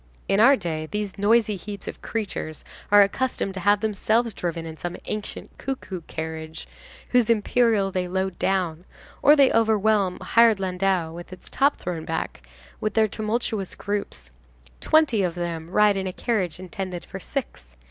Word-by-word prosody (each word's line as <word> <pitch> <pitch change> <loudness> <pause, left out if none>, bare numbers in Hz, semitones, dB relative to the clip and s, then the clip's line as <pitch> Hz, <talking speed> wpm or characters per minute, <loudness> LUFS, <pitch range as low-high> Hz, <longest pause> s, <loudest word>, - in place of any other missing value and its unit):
In 195 - +2
our 265 +6 +7
day, 160 -7 -4
these 210 -2 -4
noisy 215 +1 +3
heaps 200 +1 -8
of - - -7
creatures 195 -8 -4 0.3
are 205 0 +9
accustomed 200 -1 -1
to 190 - -5
have 205 +3 +3
themselves 220 +2 +1
driven 170 -2 -3
in 160 -1 -7
some 175 +2 -5
ancient 215 -1 -5
cuckoo 245 -9 -5
carriage, 160 0 -6 0.4
whose 245 -2 +3
imperial 220 -2 +2
they 185 -1 -1
load 190 0 -2
down, 180 -3 0 0.4
or 295 - +7
they 275 -3 +5
overwhelm 215 -4 +2
a - - -9
hired 230 -3 +5
landau, 185 -3 0
with 175 +2 -9
its 185 - -11
top 285 +1 +2
thrown 170 -3 -4
back, 160 - -4 0.4
with 215 -1 -2
their 220 -1 +4
tumultuous 215 -2 -2
groups. 200 - -4 0.5
Twenty 305 -9 +3
of 180 -2 -1
them 170 -2 -4
ride 210 +2 +4
in 190 0 -2
a 185 - -4
carriage 190 -9 -1
intended 185 -1 -6
for 190 - -8
six. 120 - -6
195 Hz, 165 wpm, -24 LUFS, 175-220 Hz, 0.5 s, are